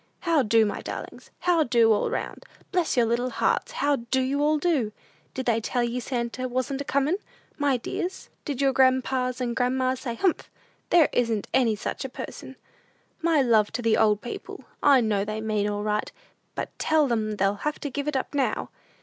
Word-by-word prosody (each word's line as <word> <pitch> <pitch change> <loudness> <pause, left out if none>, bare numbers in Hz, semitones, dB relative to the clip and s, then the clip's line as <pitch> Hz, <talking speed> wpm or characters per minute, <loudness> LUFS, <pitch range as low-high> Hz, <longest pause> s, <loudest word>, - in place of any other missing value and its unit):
"How 335 -4 +3
do, 225 -1 +4
my 205 - -3
darlings? - - -7
How 355 -2 +3
do, 235 -5 +4
all 205 - 0
round? - - -4 0.3
Bless 355 -7 0
your 240 - +5
little 240 +2 0
hearts, - - 0
how 290 - +1
do 235 +2 -1
you 275 +2 0
all 305 +1 +3
do? 290 -9 +1 0.4
Did 260 - -3
they 230 -2 +2
tell 245 +2 -1
ye 240 +1 -1
Santa 245 +1 -3
wasn't 255 +2 -2
a - - -2
comin', 280 +7 +1 0.4
my 280 -3 +2
dears? 355 +9 -4 0.2
Did 280 -3 -3
your 270 -1 +3
grandpas 260 -1 +2
and 240 -2 -2
grandmas 255 0 +1
say, 235 -3 -4
'Humph! 355 +7 0 0.4
there 335 -4 +5
isn't 230 -4 +1
any 230 -4 +3
such 210 - -4
a 265 - -4
person.' 265 +1 -8 0.7
My 325 -4 +3
love 220 -4 +3
to 245 - -3
the 225 -1 +3
good - - +3
old 210 -1 +3
people. 240 - -7 0.2
I 280 -3 +6
know 210 -3 +1
they 215 +1 -4
mean 215 -1 0
all 205 0 -3
right; 210 0 -1 0.4
but - - -4
tell 310 -1 +3
them 215 -3 -1
they'll 195 0 +2
have 300 0 -1
to 290 - -4
give 285 +2 -3
it 300 - -1
up 260 - -4
now!" 280 -2 -1
255 Hz, 200 wpm, -26 LUFS, 230-285 Hz, 0.7 s, I